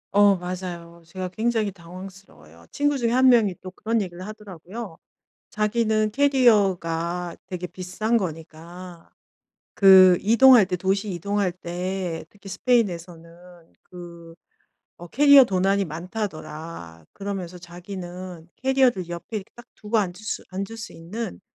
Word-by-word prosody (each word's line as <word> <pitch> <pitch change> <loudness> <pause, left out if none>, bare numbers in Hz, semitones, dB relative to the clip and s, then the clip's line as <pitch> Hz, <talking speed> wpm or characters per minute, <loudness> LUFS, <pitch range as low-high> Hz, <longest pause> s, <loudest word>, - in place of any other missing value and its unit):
어 205 0 +6
맞아요. 175 -2 -7
제가 185 +2 -6
굉장히 220 +1 -1
당황스러워요. 180 - -13
친구 290 0 0
중에 235 -3 0
1 260 +2 +5
명이 220 -7 +4
또 185 - -8
그런 225 +4 -1
얘기를 185 0 -7
하더라고요. 205 -2 -9 0.5
자기는 215 0 0
캐리어가 190 -10 +2
되게 180 -1 -5
비싼 185 +6 -3
거니까 170 -1 -6 0.7
그 190 -2 +8
이동할 235 +2 +7
때, 180 -1 -2
도시 195 +3 -1
이동할 195 +1 -1
때 180 0 -4
특히 200 -1 -14
스페인에서는 175 -6 -3
그 170 -2 -12 0.7
어 175 - -8
캐리어 280 - +7
도난이 195 -1 +1
많다더라. 155 - -7
그러면서 195 -3 -6
자기는 175 -1 -9
캐리어를 260 -9 +1
옆에 175 +6 -6
이렇게 195 - -13
딱 240 - -12
두고 215 +1 -2
앉을 185 -4 -1
수, 215 +2 -5
앉을 195 +4 -5
수 225 - -8
있는 195 +6 -7
185 Hz, 290 characters per minute, -24 LUFS, 175-215 Hz, 0.7 s, 그